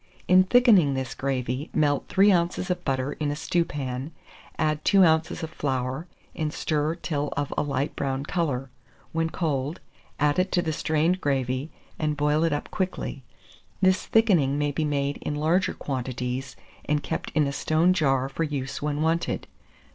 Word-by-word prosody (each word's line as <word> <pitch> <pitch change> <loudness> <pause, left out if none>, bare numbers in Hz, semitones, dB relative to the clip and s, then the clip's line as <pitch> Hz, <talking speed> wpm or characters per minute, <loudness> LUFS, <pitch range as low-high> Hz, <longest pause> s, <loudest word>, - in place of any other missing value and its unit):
In 185 +1 +6
thickening 200 - +5
this 130 -2 -3
gravy, 135 +1 -2
melt 145 -2 +2
3 200 +1 +5
oz. 170 0 +1
of 180 0 -2
butter 135 +1 -1
in 150 -2 -2
a 145 - -1
stewpan, 145 -4 -2 0.5
add 155 -1 0
2 195 -2 +5
oz. 160 +1 +1
of 160 - -4
flour, 135 +1 -2 0.3
and 155 -1 -2
stir 155 +1 -1
till 150 -4 -3
of 145 -1 -1
a - - +1
light 140 0 -2
brown 135 0 -2
colour; 140 -7 -2 0.4
when 165 0 0
cold, 150 -2 -2 0.4
add 145 +3 +2
it 185 +1 +1
to 175 - +2
the 160 -2 -1
strained 160 +4 +1
gravy, 135 0 -1 0.3
and 150 -1 0
boil 150 +2 +2
it 165 - +2
up 145 - -3
quickly. 185 -7 -3 0.6
This 185 -1 +2
thickening 175 - +3
may 145 0 0
be 155 +2 -1
made 140 -1 -1
in 150 - -4
larger 165 +5 +1
quantities, 130 0 -4 0.3
and 150 -1 0
kept 160 - -3
in 155 -2 +4
a 140 - -2
stone 160 +5 +2
jar 135 -6 +2
for 135 +4 -3
use 140 -4 -3
when 150 +1 -1
wanted. 165 +1 0
150 Hz, 170 wpm, -26 LUFS, 135-165 Hz, 0.6 s, In